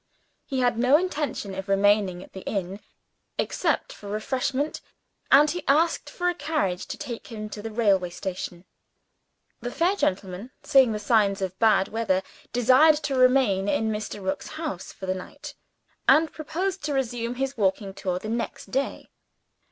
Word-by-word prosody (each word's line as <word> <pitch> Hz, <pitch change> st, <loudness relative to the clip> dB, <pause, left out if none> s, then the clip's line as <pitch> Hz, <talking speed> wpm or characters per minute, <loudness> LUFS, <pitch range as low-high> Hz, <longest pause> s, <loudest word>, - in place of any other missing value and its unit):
He 265 Hz, -3 st, -1 dB
had 245 Hz, -2 st, +2 dB
no 255 Hz, +4 st, +6 dB
intention 300 Hz, -, -2 dB
of 190 Hz, +1 st, -6 dB
remaining 195 Hz, -2 st, +3 dB
at -, -, -17 dB
the 190 Hz, -, -7 dB
inn, 195 Hz, 0 st, -3 dB, 0.6 s
except -, -, 0 dB
for 205 Hz, -, -10 dB
refreshment; 260 Hz, +7 st, -1 dB, 0.5 s
and 290 Hz, +2 st, +7 dB
he 350 Hz, +2 st, -4 dB
asked 320 Hz, +4 st, +2 dB
for 355 Hz, -, -2 dB
a 355 Hz, -, +3 dB
carriage 295 Hz, -, -2 dB
to -, -, -5 dB
take 235 Hz, -2 st, -6 dB
him 215 Hz, -2 st, -6 dB
to 210 Hz, -, -6 dB
the 225 Hz, -, -5 dB
railway 200 Hz, -5 st, +2 dB
station. 180 Hz, 0 st, -6 dB, 0.9 s
The 245 Hz, -, -4 dB
fair 345 Hz, +9 st, +1 dB
gentleman, 190 Hz, -, -2 dB
seeing 265 Hz, -4 st, +5 dB
the 215 Hz, -, -1 dB
signs 210 Hz, -2 st, +2 dB
of 190 Hz, -1 st, -4 dB
bad 215 Hz, -4 st, +4 dB
weather, 210 Hz, -4 st, 0 dB, 0.3 s
desired 260 Hz, +6 st, +6 dB
to 275 Hz, -, -1 dB
remain 255 Hz, -7 st, +4 dB
in 220 Hz, +1 st, +1 dB
Mr. 210 Hz, -2 st, -5 dB
Rook's 190 Hz, +1 st, -2 dB
house 305 Hz, -, -5 dB
for 190 Hz, -, -9 dB
the 185 Hz, -, 0 dB
night, 185 Hz, -1 st, -9 dB, 0.6 s
and 320 Hz, +1 st, +5 dB
proposed 350 Hz, +4 st, -3 dB
to 295 Hz, -, -1 dB
resume 245 Hz, -2 st, -2 dB
his 270 Hz, +2 st, -2 dB
walking 195 Hz, -1 st, 0 dB
tour 185 Hz, -2 st, -2 dB
the 200 Hz, -, -6 dB
next 230 Hz, +2 st, -4 dB
day. 270 Hz, +2 st, -2 dB
225 Hz, 165 wpm, -26 LUFS, 195-270 Hz, 0.9 s, and